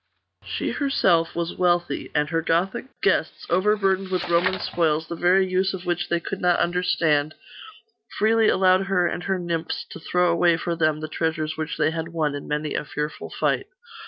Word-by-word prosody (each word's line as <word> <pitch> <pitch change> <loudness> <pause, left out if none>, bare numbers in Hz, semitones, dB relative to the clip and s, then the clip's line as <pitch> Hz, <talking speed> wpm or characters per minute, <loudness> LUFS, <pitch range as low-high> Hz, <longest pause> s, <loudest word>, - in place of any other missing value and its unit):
She - - -3
herself 180 - +1
was 170 0 -3
wealthy; 175 -1 0
and 150 0 +2
her 165 - +1
Gothic 170 +8 0 0.2
guests, - - +1
overburdened 195 0 +2
with 185 -2 -2
Roman 180 +2 +2
spoils, 160 -2 0
the 170 - -5
very 185 +3 +3
use 185 +1 0
of 185 0 -9
which 175 0 -1
they 170 - +1
could 190 +3 -6
not 175 -1 +3
understand, 160 -4 +1 0.8
freely 220 +1 +3
allowed 185 -1 +4
her 185 -2 +2
and 175 - -2
her 195 -1 0
nymphs 170 -2 -3
to - - -8
throw 180 +2 +1
away 170 0 +3
for 170 0 -2
them 155 -2 +1
the 155 - -4
treasures 155 -1 -2
which 155 0 -4
they - - +2
had 160 0 -4
won 160 -3 -1
in 145 - -6
many 150 0 -2
a - - -2
fearful 150 +1 -5
fight. - - -1
170 Hz, 185 wpm, -24 LUFS, 160-185 Hz, 0.8 s, allowed